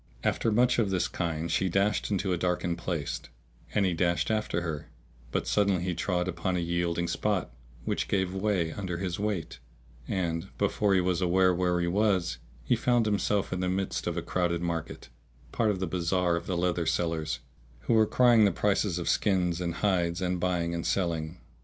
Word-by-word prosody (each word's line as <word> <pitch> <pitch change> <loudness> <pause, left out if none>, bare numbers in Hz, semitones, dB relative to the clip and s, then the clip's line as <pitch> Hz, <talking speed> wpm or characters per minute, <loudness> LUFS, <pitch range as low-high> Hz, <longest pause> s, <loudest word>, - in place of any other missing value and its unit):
After 115 - +1
much 120 +3 +3
of 105 -4 +2
this 95 -2 +1
kind 85 -1 -3
she 95 +3 +1
dashed 100 +4 +1
into 95 -2 0
a - - +2
darkened 85 -1 -1
place, 75 -9 -3 0.5
and 100 - +3
he 90 - +1
dashed 85 +4 +1
after 105 -6 0
her; 80 -4 -4 0.4
but - - -1
suddenly 100 -4 +2
he 90 -1 -1
trod 90 0 -1
upon 90 +1 -2
a - - 0
yielding 85 0 -1
spot, 95 - -1 0.3
which - - -1
gave 95 -2 0
way 95 -4 0
under 95 -3 -4
his 90 -1 -3
weight; 100 -6 -3 0.5
and, 85 -1 -1
before 100 0 +2
he 95 - +4
was 90 0 0
aware 90 +1 +4
where 90 0 +1
he 85 - +1
was, 95 -2 +1 0.2
he - - +2
found 120 -2 +2
himself 105 -2 0
in 90 - -2
the 90 0 0
midst 95 0 -2
of 85 0 -2
a 85 - -2
crowded 85 0 -1
market, 85 -2 -4 0.4
part 115 -2 +1
of 100 -3 0
the 95 - 0
bazar 90 0 +1
of 85 +1 -4
the 90 - -1
leather 85 -1 0
sellers 80 -1 0 0.4
who - - 0
were 110 -1 +5
crying 120 -2 +5
the 100 - +5
prices 100 0 +1
of 85 - -4
skins 90 -4 +1
and 85 -1 -2
hides 85 -3 +1
and 90 -1 -1
buying 85 -2 0
and 85 -1 -2
selling. 85 -3 -1
90 Hz, 190 wpm, -28 LUFS, 85-95 Hz, 0.5 s, were